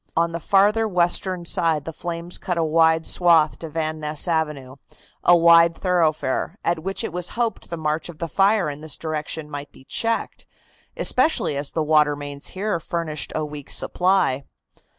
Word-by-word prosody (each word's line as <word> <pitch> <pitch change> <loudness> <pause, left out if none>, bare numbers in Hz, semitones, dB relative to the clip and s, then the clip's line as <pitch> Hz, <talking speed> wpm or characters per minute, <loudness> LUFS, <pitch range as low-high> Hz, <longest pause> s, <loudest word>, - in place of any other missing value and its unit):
On 170 0 +2
the 170 - -4
farther 205 +5 +3
western 180 -1 +1
side 160 -3 +1
the 165 - -6
flames 170 +1 -6
cut 180 -2 -3
a 165 - +2
wide 160 0 +3
swath 165 -3 +3
to 165 - -7
Van 155 0 -3
Ness 150 +2 0
Avenue, 150 -5 -2 0.5
a 175 - +6
wide 170 0 +6
thoroughfare, 165 -2 0
at 170 -1 0
which 195 +3 -3
it - - -4
was 180 0 -4
hoped 235 -2 -2
the 170 - -4
march 155 +1 -2
of 165 - -10
the 170 - -4
fire 195 +1 +2
in 145 0 -6
this 155 -3 -4
direction 155 -1 -4
might 145 -1 -7
be - - -18
checked, 230 +11 -2 0.5
especially 310 - +1
as 140 0 -3
the 160 - 0
water 150 -1 +3
mains 145 -1 -6
here 200 -3 -1
furnished 165 -3 -3
a 155 - -1
weak 150 -2 -9
supply. 180 -8 +1
165 Hz, 175 wpm, -22 LUFS, 150-175 Hz, 0.5 s, a